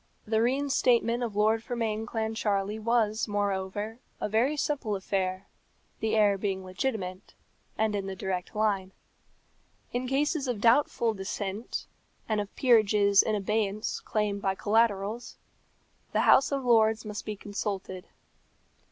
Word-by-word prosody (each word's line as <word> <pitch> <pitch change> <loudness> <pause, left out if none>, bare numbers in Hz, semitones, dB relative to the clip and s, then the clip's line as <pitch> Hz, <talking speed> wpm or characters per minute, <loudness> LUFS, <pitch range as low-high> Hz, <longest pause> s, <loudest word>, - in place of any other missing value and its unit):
The 220 0 +1
reinstatement 245 -2 +2
of 230 -4 -3
Lord 215 +2 +3
Fermain 225 -2 -2
Clancharlie 220 -2 -1
was, 225 -1 +1
moreover, 205 +2 -2 0.2
a - - -1
very 240 +8 +1
simple 275 -8 -1
affair, 190 -1 -2 0.5
the 220 0 0
heir 205 -2 +4
being 190 -2 -2
legitimate, 185 -2 -4 0.4
and 215 -1 +1
in 195 -1 -3
the 195 - -4
direct 185 0 -4
line. 200 -3 0 1.0
In 250 +1 -1
cases 285 +2 0
of 245 -4 -2
doubtful 235 0 +3
descent, 195 +2 -4 0.4
and 215 -2 +1
of 205 - -6
peerages 210 -5 +5
in 215 - 0
abeyance 210 +1 -1
claimed 210 -2 -1
by 195 -1 0
collaterals, 215 +1 0 0.8
the - - +3
House 270 - +5
of 275 -2 -1
Lords 220 -2 +4
must 210 -1 -5
be 215 - -4
consulted. 195 -2 -5
215 Hz, 130 wpm, -28 LUFS, 200-230 Hz, 1.0 s, peerages